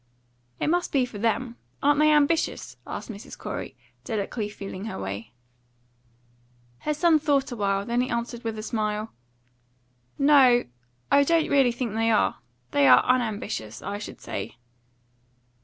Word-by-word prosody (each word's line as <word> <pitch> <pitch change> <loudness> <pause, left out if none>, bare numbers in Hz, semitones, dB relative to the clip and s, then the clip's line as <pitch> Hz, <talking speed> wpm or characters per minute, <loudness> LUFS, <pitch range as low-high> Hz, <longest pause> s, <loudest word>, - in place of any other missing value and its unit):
"It - - -1
must 350 +3 +1
be 265 -3 +2
for 215 -4 -9
them. 230 +2 -1 0.3
Aren't 290 +1 +4
they 305 0 +5
ambitious?" 300 +2 +1
asked - - -6
Mrs. 205 +1 -10
Corey, - - -6 0.3
delicately 215 -1 -3
feeling 195 -1 -7
her 225 - -5
way. 100 +3 -5 1.5
Her 300 - -1
son 320 0 +4
thought 285 -3 +1
a - - -4
while. 200 -2 0
Then 240 +2 +1
he 255 - -2
answered 235 0 -3
with 225 -1 -3
a 215 - -5
smile 215 -1 -2 1.0
"No, 275 -4 +5 0.5
I 280 - +6
don't 330 +2 +2
really 270 -3 +4
think 235 -2 -4
they 225 +1 +1
are. 220 - +2 0.3
They 140 -1 +4
are 125 -1 +7
unambitious, 215 - -1
I 205 0 -4
should 210 - -8
say." - - -5
235 Hz, 150 wpm, -25 LUFS, 210-280 Hz, 1.5 s, are